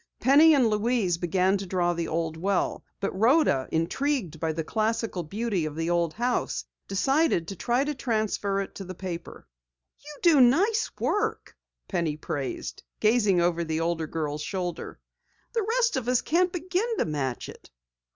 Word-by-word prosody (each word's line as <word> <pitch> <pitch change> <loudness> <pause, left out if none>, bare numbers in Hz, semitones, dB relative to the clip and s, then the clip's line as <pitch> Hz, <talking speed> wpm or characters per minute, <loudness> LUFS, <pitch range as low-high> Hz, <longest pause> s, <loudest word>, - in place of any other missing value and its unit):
Penny 300 +4 +6
and 260 -4 +4
Louise 210 -5 +1
began 185 +3 +2
to 195 - -6
draw 175 -1 +1
the 170 -1 -3
old 165 0 -2
well, 190 +3 -1 0.2
but 200 - -2
Rhoda, 220 - +3
intrigued 175 - -1
by 160 0 0
the 160 +1 -3
classical 220 0 -1
beauty 200 +2 -2
of 150 -1 -5
the 165 +1 -2 0.3
house, 245 +2 -1 0.2
decided 270 - +1
to 195 - -5
try 245 +7 +1
to 295 +1 -2
transfer 215 -6 -1
it 195 - -7
to 185 -2 -7
paper. 170 - -7 0.5
"You 295 0 -11
do 325 -6 +6
nice 395 - +3
work," 425 +2 -1 0.3
Penny 170 -5 -1
praised, 140 -3 -4 0.2
gazing 210 -5 +3
over 170 0 +1
the 160 -1 -2
older 165 -1 -1
girl's 150 -2 -3
shoulder. 175 0 -4 0.5
"The 460 - +1
rest 475 0 +2
of 255 -3 -2
us 250 -1 +3
can't 355 +3 +2
begin 370 +6 -1
to - - +1
match 140 -5 -3
it." - - -13
200 Hz, 160 wpm, -27 LUFS, 170-265 Hz, 0.5 s, Penny